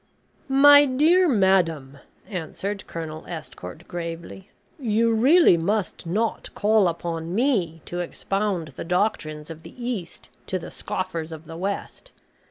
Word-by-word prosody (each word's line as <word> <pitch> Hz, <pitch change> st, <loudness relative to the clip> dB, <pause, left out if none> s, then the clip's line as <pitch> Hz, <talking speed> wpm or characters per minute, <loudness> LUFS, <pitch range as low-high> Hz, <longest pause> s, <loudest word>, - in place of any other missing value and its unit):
"My 285 Hz, +2 st, +8 dB
dear 320 Hz, +7 st, +4 dB
madam," 170 Hz, -, +2 dB, 0.3 s
answered 195 Hz, +2 st, -5 dB
Colonel 160 Hz, -1 st, -6 dB
Estcourt, 90 Hz, -, -8 dB
gravely, 170 Hz, +2 st, -7 dB, 0.3 s
"you 230 Hz, -2 st, +2 dB
really 260 Hz, -, +6 dB
must 185 Hz, +1 st, -2 dB
not 215 Hz, +6 st, -1 dB
call 210 Hz, -2 st, +3 dB
upon 170 Hz, 0 st, -3 dB
me 200 Hz, -, 0 dB
to 175 Hz, -, -5 dB
expound 190 Hz, -1 st, -2 dB
the 130 Hz, -, -8 dB
doctrines 165 Hz, -4 st, -1 dB
of 160 Hz, 0 st, -10 dB
the -, -, -13 dB
East 235 Hz, -8 st, -5 dB, 0.2 s
to 190 Hz, -, -1 dB
the 175 Hz, -, -8 dB
scoffers 165 Hz, -3 st, -4 dB
of 160 Hz, 0 st, -9 dB
the 165 Hz, -, -9 dB
West. 200 Hz, -, -5 dB
185 Hz, 130 wpm, -24 LUFS, 165-220 Hz, 0.3 s, My